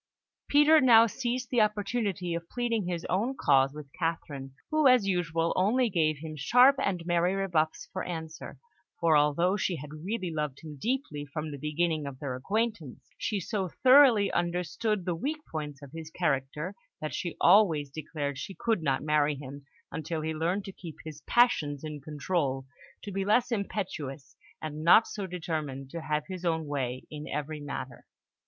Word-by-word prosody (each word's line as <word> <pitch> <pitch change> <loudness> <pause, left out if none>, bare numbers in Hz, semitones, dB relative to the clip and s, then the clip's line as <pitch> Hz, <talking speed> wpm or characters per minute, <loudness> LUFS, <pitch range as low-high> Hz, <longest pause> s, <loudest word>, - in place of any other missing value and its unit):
Peter 295 +2 +6
now 230 -3 +8
seized 245 +2 -3
the 245 -3 +4
opportunity 205 -3 0
of 170 0 -5
pleading 230 -5 -1
his 175 -2 -3
own 235 +9 -1
cause 135 -1 +4
with 150 0 -9
Catherine, 145 -5 -3 0.2
who, 310 -2 +4
as 250 -5 +5
usual, 165 -3 0
only 225 +5 +2
gave 155 -4 +2
him 155 +1 -7
sharp 250 - +5
and 180 -4 -1
merry 175 +2 +2
rebuffs 170 -5 0
for 185 - -3
answer, 160 -2 -6 0.4
for 165 -2 +4
although 150 +6 +3
she 185 -2 0
had 150 0 -8
really 190 -2 -2
loved 150 -3 -3
him 155 -2 -8
deeply 240 - -2
from 155 +2 -5
the 145 - -7
beginning 155 +1 -1
of 135 -2 -7
their 135 -1 -4
acquaintance, 200 - -3
she 210 - -1
so 195 -1 -2 0.2
thoroughly 255 -6 +7
understood 180 +4 -1
the 180 - 0
weak 280 - -2
points 150 -3 -5
of 140 - -11
his 160 0 -8
character, 150 +1 -1 0.3
that 155 - -4
she 175 - -4
always 170 -7 +5
declared 145 -2 -4
she 195 - -6
could 225 -6 0
not 135 -3 0
marry 150 -1 +2
him 140 0 -10 0.2
until 160 +1 -3
he 160 +1 -2
learned 175 +6 -1
to 195 - -6
keep 170 -4 -10
his 155 -2 -8
passions 155 - +3
in 150 -2 -6
control, 145 -2 -2 0.4
to 205 - -6
be 195 0 -1
less 225 +5 +2
impetuous, 175 - -4 0.3
and 155 0 -5
not 175 +7 +7
so 200 -2 -5
determined 155 -6 -4
to 170 - -5
have 150 -1 -1
his 185 -2 -7
own 160 -2 0
way 130 -3 -3
in 150 0 -7
every 150 +1 -4
matter. 135 -3 -6
165 Hz, 175 wpm, -29 LUFS, 150-200 Hz, 0.4 s, now